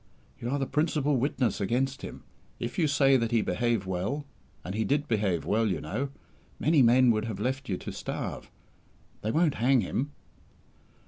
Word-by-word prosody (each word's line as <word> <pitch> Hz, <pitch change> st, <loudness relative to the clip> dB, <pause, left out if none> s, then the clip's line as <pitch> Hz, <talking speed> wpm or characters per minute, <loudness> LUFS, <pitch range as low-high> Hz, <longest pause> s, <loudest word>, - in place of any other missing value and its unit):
"You 120 Hz, -, -3 dB
are 140 Hz, -, 0 dB
the 135 Hz, -, 0 dB
principal 150 Hz, -1 st, +1 dB
witness 125 Hz, -4 st, 0 dB
against 130 Hz, +6 st, 0 dB
him. -, -, -8 dB, 0.4 s
If 120 Hz, +6 st, -4 dB
you 160 Hz, -, +4 dB
say 135 Hz, -2 st, +4 dB
that 115 Hz, -2 st, 0 dB
he 115 Hz, -2 st, +2 dB
behaved 115 Hz, +1 st, 0 dB
well 95 Hz, +11 st, -2 dB, 0.4 s
and 90 Hz, -, -4 dB
he 110 Hz, +2 st, 0 dB
did 145 Hz, +4 st, 0 dB
behave 100 Hz, -, 0 dB
well, 110 Hz, +6 st, +2 dB
you 90 Hz, -6 st, -1 dB
know: 110 Hz, -, -3 dB, 0.5 s
many 155 Hz, -1 st, +4 dB
men 125 Hz, +1 st, +6 dB
would 110 Hz, -1 st, 0 dB
have 110 Hz, -4 st, -4 dB
left 130 Hz, +4 st, -2 dB
you 95 Hz, -, 0 dB
to -, -, -6 dB
starve -, -, -5 dB, 0.7 s
they 110 Hz, -, -2 dB
won't 155 Hz, +4 st, +3 dB
hang 130 Hz, 0 st, +4 dB
him." 125 Hz, +8 st, -2 dB
120 Hz, 180 wpm, -28 LUFS, 105-140 Hz, 0.7 s, men